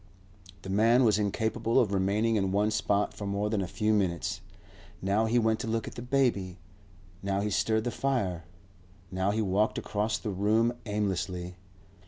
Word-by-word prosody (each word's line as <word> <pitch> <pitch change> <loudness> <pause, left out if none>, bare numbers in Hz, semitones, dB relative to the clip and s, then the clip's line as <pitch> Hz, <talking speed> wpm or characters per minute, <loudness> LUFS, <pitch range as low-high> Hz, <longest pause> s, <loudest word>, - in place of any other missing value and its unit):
The 95 - -5
man 115 +5 +4
was 110 -3 +3
incapable 110 +3 0
of 110 -6 +1
remaining 100 +4 +1
in 95 -3 +1
one 105 +2 +2
spot 105 -1 0
for 100 - -6
more 100 +1 -1
than 105 -3 0
a 95 - -2
few 105 +4 0
minutes. 90 -5 -1 0.6
Now 100 +4 +1
he 120 +2 +2
went 110 -1 +2
to - - -4
look 115 0 -1
at - - -7
the - - -7
baby; 120 -8 0 0.6
now 100 0 -1
he 105 +1 -1
stirred 110 +2 +1
the 120 - -2
fire; 100 -13 -1 0.7
now 95 +1 0
he 110 +2 0
walked 105 +2 +1
across 105 +1 -1
the 105 - -4
room 110 +5 +2
aimlessly. 95 -3 -2
105 Hz, 175 wpm, -29 LUFS, 95-110 Hz, 0.7 s, man